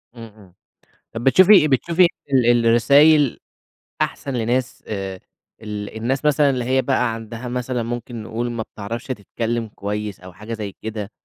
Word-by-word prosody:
إمم، 115 -1 -9
إمم. 95 -4 -18 0.6
طب 115 - -5
بتشوفي 180 +3 +6
بتشوفي 170 +7 +3 0.3
ال 125 -3 +4 0.2
الرسايل 140 +4 +5 0.6
أحسن 140 - -2
لناس 120 +1 -1
آآ، 95 -3 -5 0.4
ال 105 0 -6
الناس 130 +6 -2
مثلًا 145 -1 +4
اللي 125 -2 -1
هي 130 +1 +2
بقى 125 -4 0
عندها 115 +2 -7
مثلًا 125 -1 -2
ممكن 120 -1 -5
نقول 120 +2 -3
ما 115 -2 -3
بتعرفش 110 +5 -7
تتكلّم 115 0 -3
كويس 105 -1 -5
أو 90 0 -12
حاجة 105 +4 -8
زي 105 -3 -5
كده، 110 -1 -5
115 Hz, 150 wpm, -21 LUFS, 110-130 Hz, 0.6 s, بتشوفي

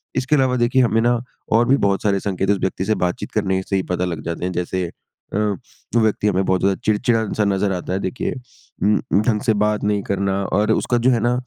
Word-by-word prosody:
इसके 130 +3 +1
अलावा 130 -2 +2
देखिए 120 +2 +3
हमें 115 -1 +2
ना, 120 0 +2 0.3
और 115 +2 +4
भी 135 - +4
बहुत 100 -1 0
सारे 100 -2 +2
संकेत 95 0 -2
है 100 - +4
उस - - -6
व्यक्ति 95 0 -1
से 110 - +1
बातचीत 105 - -5
करने 95 -3 0
से 100 - -1
ही 95 - +1
पता 90 - 0
लग 85 -3 -4
जाते 85 +1 -4
हैं 90 - -2
जैसे 90 0 -2 0.4
अ, - - 0 0.6
व्यक्ति 110 -2 +2
हमें 95 -1 +2
बहुत 95 -1 +2
ज़्यादा 95 0 +2
चिड़चिड़ा-सा 110 -1 +1
नज़र 100 0 +1
आता 90 0 -4
है 95 - 0
देखिए 95 +6 -3 0.5
उम, 105 +1 +4 0.2
उम, 100 - +4
ढंग 110 -2 0
से 115 -5 +2
बात 105 0 +1
नहीं 105 -1 +1
करना 100 0 -1
और 105 +3 +1
उसका 120 +2 +1
जो - - +6
है 120 - +2
ना, 120 +2 +1
105 Hz, 235 wpm, -20 LUFS, 95-115 Hz, 0.6 s, जो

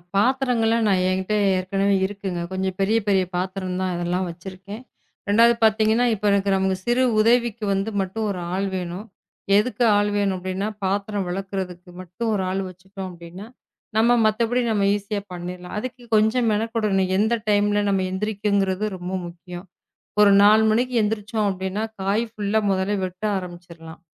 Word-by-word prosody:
பாத்திரங்கள்லாம் 230 0 +2
நான் 185 -2 +2
என்கிட்ட 190 +2 -1 0.2
ஏற்கனவே 195 +2 +1
இருக்குங்க. 195 -2 -4
கொஞ்சம் 190 0 -2
பெரிய 210 +4 +2
பெரிய 195 -2 +3
பாத்திரம் 185 0 -3
தான், 185 -1 -1
அதெல்லாம் 175 +2 -1
வச்சிருக்கேன். 190 +5 -9 0.5
2வது 230 +3 +5
பாத்தீங்கன்னா 220 +2 +3
இப்ப 210 -1 -4
எனக்கு 200 0 +2
நம்ம 190 0 +1
சிறு 240 +2 +2 0.2
உதவிக்கு 235 0 +2
வந்து 195 +2 -1
மட்டும் 195 +4 -3
ஒரு 190 -3 -3
ஆள் 195 +1 -1
வேணும். 180 +2 -5 0.5
எதுக்கு 245 +3 +1
ஆள் 205 0 +2
வேணும் 200 -2 +1
அப்படின்னா 185 +2 -3 0.2
பாத்திரம் 200 +1 -1
விளக்கறதுக்கு 185 -1 -5
மட்டும் 185 +6 -4
ஒரு 195 -2 0
ஆள் 190 +1 -1
வச்சுகிட்டோம் 190 +1 -9
அப்படின்னா. 175 +3 -10 0.5
நம்ம 235 +2 +4
மத்தபடி 230 +3 +1
நாம 205 -3 +1
ஈஸியா 205 0 -4
பண்ணிடலாம். 180 0 -7
அதுக்கு 250 +3 -5
கொஞ்சம் 220 +3 +3
மென 215 +1 +1
கொடணும். 195 -5 +1
எந்த 220 +3 +2
டைம்ல 205 0 +2
நம்ம 195 -1 +1
எந்திரிக்கிறது 200 0 0
ரொம்ப 180 +1 -6
முக்கியம். 175 +1 -10 0.6
ஒரு 205 -1 +7
4 215 +2 +6
மணிக்கு 245 +3 0
எந்திருச்சோம். 210 0 -1
அப்படின்னா 190 +2 -3 0.2
காய் 200 +4 +1
புல்லா 210 +1 0
முதல்ல 195 +2 0
வெட்ட 185 +2 -9
ஆரம்பிச்சிடலாம். 175 -3 -10
200 Hz, 150 wpm, -23 LUFS, 185-215 Hz, 0.6 s, ஒரு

